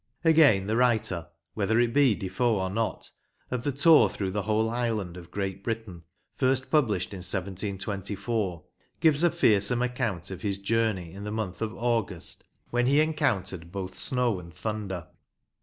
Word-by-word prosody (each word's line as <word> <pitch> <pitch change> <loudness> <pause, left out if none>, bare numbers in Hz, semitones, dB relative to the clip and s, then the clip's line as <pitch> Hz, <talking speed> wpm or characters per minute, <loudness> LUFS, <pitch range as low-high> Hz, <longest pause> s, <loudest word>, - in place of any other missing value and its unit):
Again, 150 - +5
the 110 +3 0
writer 110 -8 +1 0.3
(whether 110 +2 +1
it 120 -1 +2
be 140 -6 +4
Defoe 100 +5 0
or 95 0 -2
not) 110 +2 -2 0.4
of 125 -2 -1
the 145 - 0
Tour 150 +4 +6
Through 95 -2 -3
the 105 +2 -1
Whole 110 +2 +1
Island 110 -6 -2
of 90 -2 -11
Great 95 0 -4
Britain, 110 -8 -5 0.3
first 130 0 +1
published 110 - +1
in - - -5
1724, 100 +1 -3 0.4
gives 155 -1 +4
a 175 - +6
fearsome 110 -1 +2
account 115 -8 -2
of 90 -2 -7
his 100 -1 -1
journey 100 -4 -1
in 100 +1 -8
the 105 - -4
month 105 -4 -4
of 110 -1 -1
August, 115 -7 -2 0.3
when 120 0 +2
he 140 +3 +4
encountered 110 - 0
both 95 -1 -5
snow 125 -6 +1
and 85 -1 -11
thunder. 95 -3 -4
105 Hz, 160 wpm, -27 LUFS, 95-120 Hz, 0.4 s, Tour